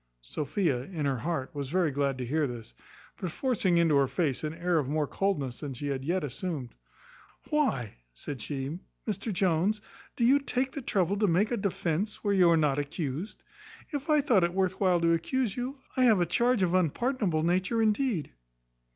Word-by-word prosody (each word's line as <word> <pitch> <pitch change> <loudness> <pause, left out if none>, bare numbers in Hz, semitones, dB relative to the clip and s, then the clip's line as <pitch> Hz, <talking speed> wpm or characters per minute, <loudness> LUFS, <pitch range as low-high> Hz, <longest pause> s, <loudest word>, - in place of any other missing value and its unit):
Sophia, 145 - -1
in 160 -4 -4
her 135 -3 0
heart, 160 +1 -3
was 140 -3 -4
very 175 -1 +2
glad 140 -1 0
to 125 - -3
hear 150 +4 +1
this; 115 - -8 0.4
but 185 - -3
forcing 195 - +1
into 165 -3 +4
her 140 -1 +4
face 150 -3 -1
an 155 - -1
air 170 0 +1
of 135 -3 -2
more 150 0 +1
coldness 145 -8 -1
than 140 -4 -5
she 145 +4 -4
had 135 -1 -2
yet 175 +5 0
assumed, 145 -2 -4 0.8
"Why," 260 - 0 0.2
said 135 - -7
she, 140 +5 -4 0.3
"Mr 215 +1 -2
Jones, 190 +2 +1 0.4
do 235 - +1
you 270 +4 +6
take 260 -1 -1
the 285 - -5
trouble 195 -4 +1
to 210 - +3
make 195 +6 +2
a - - +2
defence 195 +1 -2
where 205 -1 +2
you 185 -3 +5
are 165 - +5
not 145 -3 +2
accused? 145 +5 -4 0.5
If 290 +1 -4
I 300 -1 +5
thought 235 - +3
it 175 +1 0
worth 190 -1 0
while 185 -3 +3
to 165 0 +4
accuse 210 +6 0
you, 255 +3 -4 0.2
I 255 - +4
have 220 -5 +5
a 175 - +3
charge 235 +4 +2
of 180 -1 +1
unpardonable 185 - +1
nature 185 +7 +1
indeed." 220 - +1
175 Hz, 195 wpm, -29 LUFS, 145-210 Hz, 0.8 s, you